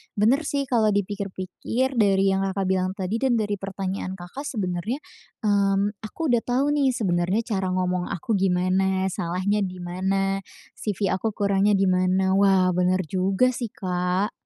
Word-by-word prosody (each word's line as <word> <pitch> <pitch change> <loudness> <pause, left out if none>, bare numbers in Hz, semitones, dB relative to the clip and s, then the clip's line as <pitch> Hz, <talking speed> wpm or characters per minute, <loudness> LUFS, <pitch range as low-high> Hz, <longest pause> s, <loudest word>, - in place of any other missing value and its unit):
benar 255 +9 +2
sih 280 -1 0
kalau 225 -6 +2
dipikir-pikir 205 +6 -2
dari 195 -1 +4
yang 190 - +1
Kakak 195 0 -2
bilang 185 0 +1
tadi 200 +3 -2
dan 260 -3 +2
dari 205 -3 -1
pertanyaan 195 -1 -4
Kakak 190 +11 -8
sebenarnya, 200 +1 -2 0.5
mmm, 200 -1 +2
aku 255 +6 -3
udah 240 - +4
tahu 265 +5 +1
nih 275 -4 +2
sebenarnya 185 0 0
cara 195 -5 -2
ngomong 180 -1 -1
aku 175 +7 -4
gimana, 190 +1 +1
salahnya 185 +5 -1
di 185 -2 -3
mana, 195 +2 0 0.4
CV 200 -2 -1
aku 205 +3 -1
kurangnya 200 0 +2
di 195 - +2
mana. 185 +1 +2
Wah 190 -2 +4
benar 180 +1 +1
juga 190 +8 +1
sih. 240 -1 -4
Kak. 180 +2 -1
195 Hz, 155 wpm, -24 LUFS, 185-215 Hz, 0.5 s, dari